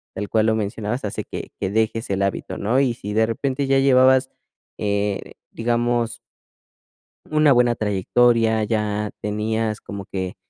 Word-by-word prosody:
tal 100 +1 -4
cual 110 0 +2
lo 110 - +3
mencionabas, 110 +3 -3
hace 100 - -4
que - - -7
que 95 - -1
dejes 110 +1 0
el 100 0 0
hábito, 100 - -3
¿no? 115 +6 +1
Y 135 -3 +2
si 105 -2 -6
de 110 +1 +3
repente 135 +4 -2
ya 135 0 +3
llevabas, 130 0 +5 0.5
eh, 100 -1 -1 0.2
digamos 120 0 0 1.1
una 155 -1 +4
buena 120 -2 +4
trayectoria, 110 +2 +2
ya 105 -1 -1
tenías 110 +1 -2
como 100 -1 -7
que, 95 -2 -4
110 Hz, 150 wpm, -22 LUFS, 105-120 Hz, 1.1 s, llevabas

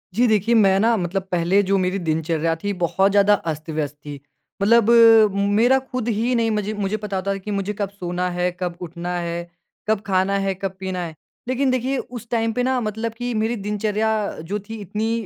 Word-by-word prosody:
जी 245 +2 +4
देखिए, 220 +2 +2
मैं 195 -3 +4
ना 230 +2 +3
मतलब 185 +1 -2
पहले 180 +3 +3
जो 195 +1 +1
मेरी 185 +1 0
दिनचर्या 160 +1 0
थी, 205 - 0
बहुत 190 +2 +1
ज़्यादा 205 0 +5 0.2
अस्त-व्यस्त 155 -1 -4
थी। 145 -1 -7 0.4
मतलब 230 +2 +4 0.7
मेरा 250 +3 +5
खुद 255 -3 -5
ही 230 +2 0
नहीं 230 -1 +1
मुझे 210 0 -1
मुझे 205 0 -2
पता 205 -2 -4
होता 195 +1 -1
था - - -4
कि 210 - -5
मुझे 200 0 -2
कब 200 - -1
सोना 180 -2 -3
है, 180 0 +1
कब 175 -2 -3
उठना 175 +1 -5
है, 170 0 -3 0.5
कब 215 -2 +1
खाना 190 0 +1
है, 195 - +1
कब 190 -1 -2
पीना 190 -1 -4
है। 160 -2 -8 0.3
लेकिन 260 +1 +1
देखिए, 255 +2 0
उस 240 -2 -7
टाइम 225 -1 +1
पे 250 - +2
ना 260 -1 +1
मतलब 220 +2 -3
कि 245 0 -2
मेरी 230 +2 0
दिनचर्या 210 +1 0 0.4
जो 205 +1 -1
थी, 225 - -5
इतनी 215 +4 -2
200 Hz, 200 wpm, -22 LUFS, 180-225 Hz, 0.7 s, ज़्यादा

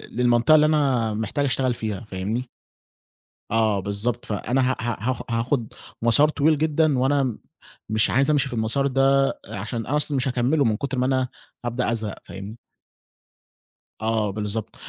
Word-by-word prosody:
للمنطقة 120 +5 +4
اللي 150 0 +5
أنا 135 -8 +2
محتاج 110 +7 -1
أشتغل 130 -2 +1
فيها 110 -4 -4
فاهمني؟ 110 +4 -4 1.0
آه 110 -3 +2
بالضبط، 100 +5 -2
فأنا 125 +5 0
ه - - -1
ه 120 -2 -1
هاخ 130 +4 -2
هاخد 115 0 -1 0.3
مسار 145 +6 +5
طويل 155 +1 +2
جدًا 155 -2 +2
وأنا 140 +1 +2
م 120 -5 -2 0.5
مش 110 0 +2
عايز 135 +4 +2
أمشي 140 -2 +2
في 125 - -7
المسار 115 +5 +1
ده 135 +1 +3 0.2
عشان 110 +2 -4
أصل 145 +2 0
مش 135 +1 0
هاكمله 130 +4 +1
من 110 -2 +1
كتر 140 -2 -3
ما 125 - +1
أنا 130 -1 +1 0.4
هابدأ 120 0 -1
أزهق، 110 -3 -2
فاهمني؟ 100 +4 -9 1.4
آه 110 -2 0
بالضبط 105 +1 -4
120 Hz, 155 wpm, -23 LUFS, 110-135 Hz, 1.4 s, اللي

